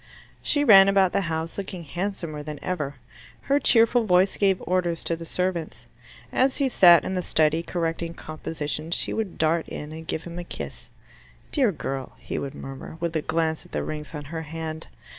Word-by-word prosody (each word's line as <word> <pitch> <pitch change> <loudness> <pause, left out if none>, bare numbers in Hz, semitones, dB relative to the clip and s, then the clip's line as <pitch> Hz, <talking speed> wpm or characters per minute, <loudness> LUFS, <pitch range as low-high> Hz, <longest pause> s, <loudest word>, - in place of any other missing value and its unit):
She 290 - +1
ran 195 -7 +8
about 195 -2 +4
the - - +2
house 160 +3 -3
looking 185 -3 -5
handsomer 170 -2 -4
than 150 0 -6
ever. 150 -6 -2 0.5
Her 280 +1 +2
cheerful 235 -2 +4
voice 185 0 +4
gave 195 -2 +2
orders 175 -2 0
to 165 - -1
the 165 0 -9
servants. 170 -9 -2 0.5
As 260 +1 +2
he 275 -2 +2
sat 175 - +7
in - - -2
the 185 - 0
study 160 -1 +2
correcting 170 -1 -3
compositions, 155 +1 -4
she - - -2
would 215 -5 -3
dart 160 +1 +1
in 150 +1 -6
and 160 +1 -8
give 160 - -2
him 170 0 -7
a - - -4
kiss. - - -7 0.6
"Dear 260 -8 +3
girl 135 -6 -5
" - - -28
he - - -4
would 140 +1 -5
murmur, 135 +3 -8
with 170 -1 -2
a 155 - +1
glance 160 0 -1
at - - -19
the - - -1
rings 150 +1 -6
on 150 - -5
her 160 - -2
hand. 160 0 -6
170 Hz, 195 wpm, -25 LUFS, 155-190 Hz, 0.6 s, ran